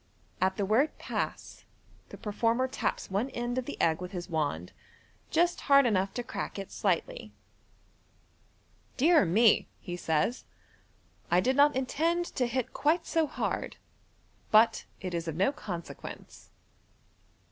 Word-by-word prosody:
*' - - -34
At 190 0 +2
the 200 - 0
word, 245 +10 +2
"Pass," - - -4 0.5
the - - -10
performer 230 +4 0
taps 255 - -3
one 210 +7 0
end 240 0 -2
of 255 - -5
the 290 - -7
egg 160 +1 +2
with 180 +2 -7
his 175 0 -6
wand, 145 - -2 0.6
just 345 +2 +2
hard 275 -1 +7
enough 195 -4 +1
to 245 - -2
crack 230 - -5
it 195 -1 -6
slightly. - - -1 0.8
* - - -36
Dear 315 - +5
me," 215 +6 +4
he 175 -2 -6
says; 165 +7 -1 0.4
" - - -36
I 175 - +4
did 260 +8 +1
not 285 0 +5
intend 325 +7 0
to 250 -3 0
hit 250 0 -2
quite 315 +4 +1
so 325 -2 +1
hard - - -3
j - - -24 0.7
but 220 +2 +4
it 185 -2 -5
is 170 -1 -3
of 160 - -3
no 195 +10 +2
consequence.' 175 - -8
230 Hz, 155 wpm, -29 LUFS, 185-275 Hz, 0.8 s, hard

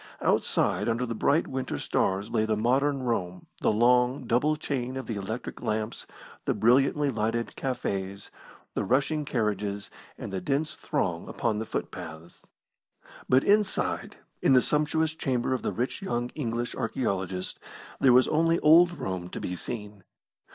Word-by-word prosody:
Outside - - +1
under 115 +2 0
the 115 - -3
bright 140 +8 +2
winter 130 -1 -3
stars 95 +2 0
lay 110 -2 +2
the 110 0 +1
modern 135 +4 +1
Rome, 90 -7 -2 0.2
the - - +3
long, 125 +4 +3
double 125 +7 +2
chain 130 -3 -3
of 130 - -4
the 115 - -4
electric 105 +4 -5
lamps, 110 +1 -3 0.4
the - - +1
brilliantly 135 +5 +3
lighted 115 +1 -1
cafes, 100 -7 -3 0.4
the - - -1
rushing 140 +7 +1
carriages, 105 -5 -2 0.3
and - - -7
the 95 - -2
dense 140 - -1
throng - - -2
upon 110 -2 -1
the 110 - -4
footpaths. 80 +2 -7 0.8
But 130 +1 +5
inside, 205 0 +1 0.3
in - - +4
the 130 - +7
sumptuous 155 +1 +1
chamber 130 -4 -1
of 130 - -1
the - - -1
rich 125 - -3
young 120 -10 -2
English 120 -4 -3
archaeologist, 95 -6 -2 0.4
there 135 - +5
was 125 +1 +6
only 165 +2 +3
old 170 +3 +6
Rome 90 -2 -4
to - - -6
be 90 - -3
seen. 105 -1 -6
120 Hz, 150 wpm, -28 LUFS, 105-135 Hz, 0.8 s, the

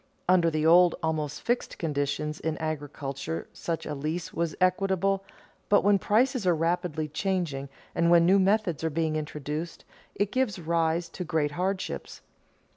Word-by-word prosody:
Under 175 -2 +5
the 155 -1 -1
old, 175 +1 +6
almost 155 -2 -2
fixed, 240 +1 -1
conditions 150 0 -2
in 160 -1 -2
agriculture 140 - -4
such 165 -1 -4
a 150 - -3
lease 155 +5 -4
was 170 -1 -1
equitable, 195 +1 +1 0.5
but 205 - +5
when 200 0 +4
prices 235 +2 +2
are 175 - +4
rapidly 165 -1 -1
changing 150 -5 -2 0.2
and 170 0 +2
when 170 -1 +6
new 190 +3 +5
methods 190 -5 +1
are 160 - +1
being 160 0 -1
introduced, 150 +2 -5 0.3
it 205 0 0
gives 255 -7 0
rise 165 0 0
to 180 - -6
great 155 -3 0
hardships. 185 +4 -3
165 Hz, 150 wpm, -27 LUFS, 155-185 Hz, 0.5 s, old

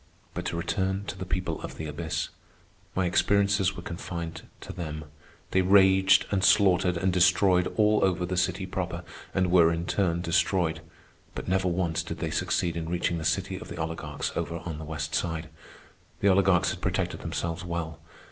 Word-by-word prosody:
But - - -4
to 85 - -2
return 95 +3 -1
to 95 - -5
the 95 -1 -6
people 90 0 -2
of - - -7
the 80 - -5
abyss. 80 +2 -3 0.7
My 95 - +1
experiences 100 +1 +2
were 90 - -7
confined 85 -1 -5 0.2
to - - -8
them. 75 -3 -5 0.5
They 95 - +3
raged 95 0 +5
and 95 -2 +1
slaughtered 90 -4 +4
and 95 +1 +1
destroyed 90 0 +4
all 105 0 +4
over 90 -2 +1
the 90 +1 -3
city 90 +1 0
proper, 90 -2 -4 0.3
and 95 -1 +1
were 85 -2 +6
in 85 0 -2
turn 85 -3 0
destroyed; 85 -1 +1 0.5
but - - -6
never 95 0 +1
once 85 -2 0
did 85 - -6
they - - -3
succeed 85 -3 0
in 80 -1 -4
reaching 90 0 0
the - - -5
city 95 +3 0
of 110 - -9
the - - -8
oligarchs 80 -2 -3
over 85 - -2
on 80 -3 -5
the 80 - -7
west 75 0 -4
side. 80 -1 -2 0.7
The 100 - +4
oligarchs 95 -2 +4
had - - -7
protected - - -1
themselves 85 0 -3
well. 85 -2 -4
90 Hz, 180 wpm, -27 LUFS, 85-95 Hz, 0.7 s, were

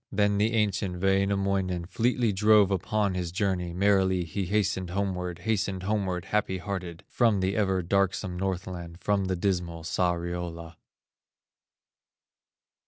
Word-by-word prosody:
Then 100 0 +2
the 110 +2 +2
ancient 100 -4 0
Wainamoinen 95 -2 +1
Fleetly 115 +3 +1
drove 105 0 +5
upon 100 +1 0
his 90 -2 -3
journey, 95 -3 -1
Merrily 95 0 +2
he 85 +3 -3
hastened 100 -2 0
homeward, 90 -2 -2
Hastened 100 -4 -1
homeward, 95 -3 -1
happy 105 -3 0
hearted 90 -3 -5
From 115 -5 +2
the 95 +1 0
ever 95 -3 +1
darksome 95 0 0
Northland 90 -2 -4
From 100 -1 +1
the 95 0 -1
dismal 85 -3 -2
Sariola. 85 0 -2
95 Hz, 120 wpm, -27 LUFS, 90-100 Hz, -, drove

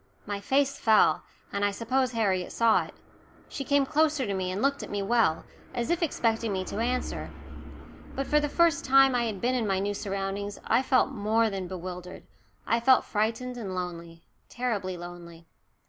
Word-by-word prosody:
My 205 -1 -3
face 275 +4 +1
fell, 220 -1 +4 0.3
and 200 - -1
I 205 - +3
suppose 255 +5 -1
Harriet 195 -5 0
saw 230 -1 +3
it. - - -14 0.5
She 275 - -5
came 280 0 +2
closer 300 -1 +1
to 200 - -2
me 185 -1 -2
and 185 +2 -3
looked 280 +3 +1
at - - -7
me 205 -1 -2
well, 210 -7 +2 0.3
as 240 +5 -1
if 345 - 0
expecting 230 -8 0
me 190 -1 -1
to 205 - -5
answer. 250 +2 -2 0.9
But 275 - -2
for 300 - +3
the 295 0 -1
first 335 -2 +3
time 270 0 +6
since 245 -1 +1
I - - 0
had 215 -4 -3
been 250 +2 +1
in 240 -4 0
my 195 -1 +1
new 200 +2 -1
surroundings 200 0 -4
I - - +3
felt 260 +1 +2
more 220 -1 +1
than 190 -2 -4
bewildered 180 0 -7 0.4
I 230 - +2
felt 255 +2 +4
frightened 230 +4 -2
and 195 -5 -5
lonely, 170 -2 -6 0.3
terribly 205 -7 -2
lonely. 170 -1 -10
220 Hz, 190 wpm, -28 LUFS, 190-255 Hz, 0.9 s, time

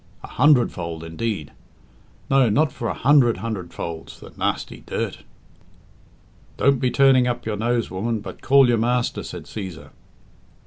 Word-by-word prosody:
A - - -7
hundredfold, 115 - +2
indeed! 80 0 -4 0.8
No, 135 -3 +4
not 145 +7 +2
for 120 - -5
a - - -1
hundred 130 -3 +4
hundredfolds, 85 -6 -6
the - - -12
nasty - - -3
dirt." - - -3 1.4
"Don't 135 -1 +2
he 125 - +3
turning 130 -1 +4
up 120 0 -3
your 110 -1 -2
nose, 115 +1 -1
woman, 110 +4 -2
but 105 - -9
call 135 -1 +5
your 120 -2 +2
master," 120 +1 0
said - - -8
Cæsar. 95 -6 -8
115 Hz, 140 wpm, -22 LUFS, 100-130 Hz, 1.4 s, call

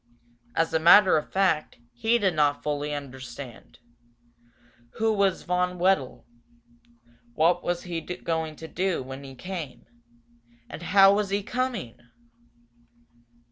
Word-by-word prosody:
As 165 0 0
a 160 - +3
matter 185 +4 +7
of 155 - -2
fact, 185 -5 0 0.2
he 235 0 +1
did 195 -5 +1
not 145 -2 +1
fully 150 0 -2
understand. 130 -3 -8 1.2
Who 220 0 +1
was 200 -3 +1
Von 180 0 -1
Wedel? 175 -7 0 1.1
What 170 +3 +2
was 175 0 -2
he 170 -2 -4
going 160 -3 -4
to 160 - -9
do 185 -3 -1
when 135 +2 -9
he 135 -1 -10
came? 165 -3 -7 0.8
And - - -9
how 195 +2 +6
was 205 -1 0
he 200 +1 -1
coming? 235 - -3
175 Hz, 125 wpm, -26 LUFS, 145-195 Hz, 1.2 s, matter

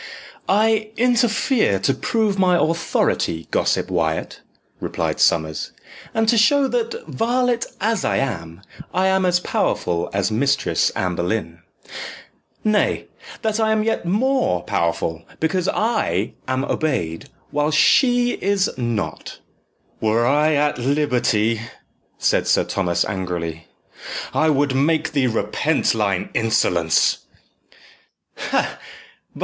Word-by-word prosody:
"I 215 +1 +2
interfere 240 - +2
to 135 - +2
prove 220 - 0
my 180 -2 +4
authority, 155 - 0
gossip - - 0
Wyat," 80 -3 -1 0.4
replied - - -2
Sommers, 80 -2 +1 0.4
"and 225 0 0
to 230 0 +4
show 280 +4 +4
that, 465 0 -2
varlet 240 +1 0
as 220 -1 0
I - - +1
am, 85 -9 -4 0.3
I 185 +1 +2
am 190 -1 +2
as 180 0 +3
powerful 85 - -1
as 100 +1 0
Mistress 140 +6 +1
Anne 90 -1 -1
Boleyn 85 -2 -3 1.0
nay, 215 -1 +1 0.3
that 220 0 0
I 220 -1 +2
am 215 -1 +2
yet 225 - -1
more 215 - +1
powerful, 85 0 -1 0.2
because 175 +3 0
I 205 - 0
am 130 +1 -1
obeyed, 85 - -2 0.2
while 150 +1 +1
she 245 - +4
is 200 -2 0
not." 120 -4 -3 0.6
"Were 110 +2 +2
I 150 +4 +3
at 145 -2 +1
liberty," 120 -5 +1 0.6
said - - +1
Sir - - +3
Thomas 90 -3 0
angrily, 85 -3 -4 0.7
"I 155 - +2
would 145 -2 +2
make 155 +3 +1
thee 140 -4 +1
repent 145 +6 0
thine 100 -4 -1
insolence." 90 -8 +2
150 Hz, 115 wpm, -21 LUFS, -, 1.0 s, my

